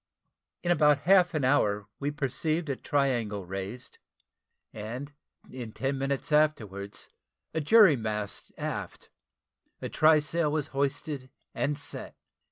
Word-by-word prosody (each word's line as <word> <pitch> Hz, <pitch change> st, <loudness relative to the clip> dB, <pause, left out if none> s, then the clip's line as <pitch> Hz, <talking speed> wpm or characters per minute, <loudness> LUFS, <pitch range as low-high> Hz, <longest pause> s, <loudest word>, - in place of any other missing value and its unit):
In 175 Hz, -, +1 dB
about 150 Hz, -4 st, +4 dB
half 180 Hz, 0 st, +4 dB
an 145 Hz, -4 st, +1 dB
hour 105 Hz, -6 st, +2 dB
we 145 Hz, -, -1 dB
perceived 150 Hz, +2 st, -1 dB
a -, -, -1 dB
triangle 120 Hz, -9 st, 0 dB
raised; 95 Hz, +6 st, -6 dB, 0.7 s
and 120 Hz, +7 st, -6 dB, 0.4 s
in 120 Hz, -4 st, -7 dB
ten 135 Hz, +1 st, -1 dB
minutes 135 Hz, +2 st, -2 dB
afterwards, 110 Hz, -10 st, 0 dB, 0.5 s
a 160 Hz, -, 0 dB
jury 200 Hz, 0 st, +7 dB
mast 105 Hz, -3 st, -4 dB
abaft -, -, -5 dB, 0.7 s
a -, -, -5 dB
try 155 Hz, 0 st, +5 dB
sail 150 Hz, +1 st, +1 dB
was 150 Hz, -2 st, -1 dB
hoisted 140 Hz, -1 st, -2 dB, 0.2 s
and 145 Hz, 0 st, -1 dB
set. 140 Hz, -, -6 dB
140 Hz, 125 wpm, -29 LUFS, 115-155 Hz, 0.7 s, jury